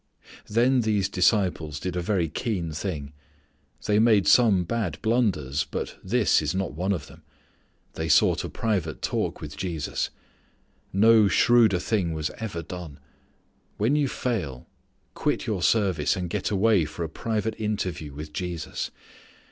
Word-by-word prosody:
Then 120 +4 +3
these 105 -4 +1
disciples 90 -6 +1
did 90 +1 -4
a 90 - -1
very 90 -2 0
keen 85 - -3
thing. 75 -3 -4 0.7
They 105 0 +3
made 110 -4 +4
some 100 -3 +5
bad 90 -4 -2
blunders 95 - +1
but - - -4
this 110 0 +3
is 75 +3 -2
not 95 -4 -2
one 90 +6 -1
of 85 -8 -2
them. 80 +4 -15 0.7
They 80 0 -3
sought 75 - +4
a - - -4
private 95 -9 -2
talk - - -2
with 75 -1 -7
Jesus. 80 -4 -3 0.8
No 110 +2 +5
shrewder 110 +1 +4
thing 90 -3 -1
was 75 -1 -2
ever 95 -7 -4
done. 85 -4 -8 0.8
When 115 +8 +2
you 145 -2 +2
fail, 90 - -3 0.5
quit - - -1
your - - -2
service 95 -10 +2
and 90 -2 -4
get - - -1
away 100 -3 +3
for 75 +3 -5
a - - -2
private 110 +6 -2
interview 95 -9 -3
with 75 +2 -8
Jesus. 90 -1 -4
95 Hz, 150 wpm, -26 LUFS, 80-110 Hz, 0.8 s, some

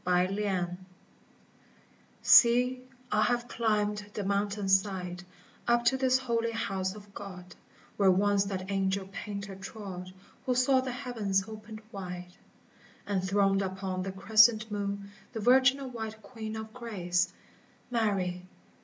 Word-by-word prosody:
SAN 180 +1 +2
MINIATO 185 -4 -1 1.5
SEE, 250 +1 +6 0.3
I 215 - +3
have 240 +2 +1
climbed 210 -3 0
the 205 - -2
mountainside 195 -2 0 0.4
Up 240 0 +3
to 265 - +4
this 260 -1 +3
holy 230 -3 -1
house 195 -3 -2
of 205 -1 -13
God, 180 -3 -9 0.4
Where 195 -2 +5
once 200 +1 +3
that 190 -1 -4
Angel 195 0 0
Painter 200 -1 -6
trod 190 -2 -8 0.4
Who 250 - +2
saw 260 +1 +4
the 260 0 -3
heavens 225 -7 -1
opened 215 0 -9
wide, 180 -2 -7 0.7
And 195 -2 -1
throned 195 +1 +2
upon 190 -1 -3
the 190 +1 -3
crescent 215 +3 +4
moon 200 -1 -3 0.2
The 225 - -3
Virginal 260 +3 +4
white 220 -2 -6
Queen 220 0 -6
of 220 0 -7
Grace, 185 -8 -1 0.3
— - - -32
Mary 190 -6 0
205 Hz, 130 wpm, -30 LUFS, 190-230 Hz, 1.5 s, SEE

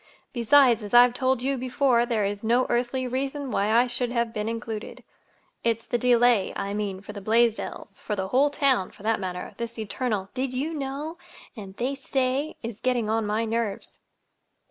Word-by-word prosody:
Besides, 245 -1 +5
as 210 +2 -3
I've 245 0 +8
told 260 0 0
you 275 +1 0
before, 250 -1 +2
there 220 -4 +1
is 205 +1 -3
no 240 +3 +3
earthly 250 +2 0
reason 270 +2 -3
why 200 +1 +1
I 235 +3 +5
should 245 0 -2
have 235 -2 -1
been 210 0 -2
included. 225 -1 -6 0.6
It's 230 -1 0
the 240 - -1
delay, 240 -4 +4
I 200 0 -3
mean, 200 -2 -3
for 205 +1 -9
the 200 - -7
Blaisdells—for 225 0 0
the 190 -1 -3
whole 270 +6 +4
town, 270 -9 +1
for - - -17
that 225 +1 +1
matter. 180 -2 -5
This 235 0 -5
eternal 215 -2 -3
'Did 260 0 -2
you 295 +6 -2
know?' 295 +3 -5 0.4
and 195 -4 -10
'They 255 +3 -1
say' 270 +1 -1
is 230 -2 -6
getting 240 -4 0
on 220 -1 0
my 215 +2 0
nerves!" 225 -3 -3
235 Hz, 180 wpm, -26 LUFS, 215-255 Hz, 0.6 s, I've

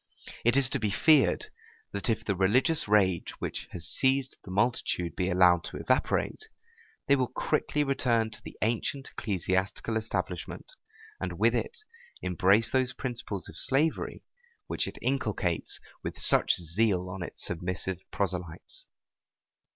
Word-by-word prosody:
It 120 +3 +4
is 135 -2 +6
to 140 - 0
be 110 -2 0
feared, 130 - +3 0.4
that 100 +3 -2
if 110 - 0
the 100 - 0
religious 120 - +3
rage 95 -4 +2
which - - -4
has 85 -2 -5
seized 135 0 +1
the - - -11
multitude 95 -5 0
be 90 0 0
allowed 90 -2 +5
to - - -6
evaporate, 285 - 0 0.6
they 140 - +5
will 130 -2 +1
quickly 150 +3 0
return 120 -5 +1
to 110 - -8
the - - -11
ancient 120 +4 -1
ecclesiastical 95 +3 -1
establishment; 110 - -4 0.5
and - - -3
with - - +3
it 475 - -2 0.4
embrace 95 +5 +3
those 130 -1 +1
principles 120 -7 -4
of - - -11
slavery 150 - 0 0.4
which - - -1
it - - -7
inculcates 105 -10 -1 0.2
with - - -5
such - - +4
zeal 90 +2 +1
on 90 +1 -6
its 85 - -6
submissive 90 +1 -3
proselytes. 90 -4 -3
105 Hz, 140 wpm, -29 LUFS, 90-130 Hz, 0.6 s, is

